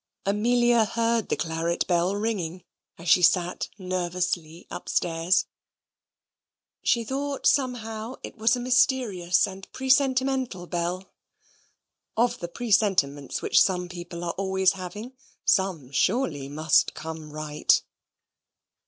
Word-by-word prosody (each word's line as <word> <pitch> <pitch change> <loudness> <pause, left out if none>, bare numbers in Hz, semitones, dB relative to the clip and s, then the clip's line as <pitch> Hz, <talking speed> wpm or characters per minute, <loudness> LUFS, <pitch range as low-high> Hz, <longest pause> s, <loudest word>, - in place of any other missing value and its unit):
Amelia 235 +3 +3
heard 230 0 0
the - - +1
claret 165 +1 -1
bell 180 +2 +1
ringing 190 -5 -3 0.3
as 170 - -10
she 175 +3 +6
sat 180 0 +2
nervously 180 -3 -3
upstairs. 170 +2 0 1.4
She 235 - +2
thought, 275 +4 -3
somehow, 235 -3 0
it - - -8
was 225 +1 +2
a - - -4
mysterious 240 -8 +2
and 190 -1 -10
presentimental 260 -6 +1
bell. 175 +2 -3 1.1
Of 240 +2 +2
the 170 - -4
presentiments 185 - 0
which - - +4
some 180 -2 +1
people 175 -1 -7
are 170 - -2
always 190 -1 +2
having, 195 +6 -7 0.3
some 175 -9 +1
surely 150 - 0
must 155 +2 +2
come 160 -1 -7
right. 150 0 +1
185 Hz, 110 wpm, -26 LUFS, 170-230 Hz, 1.4 s, she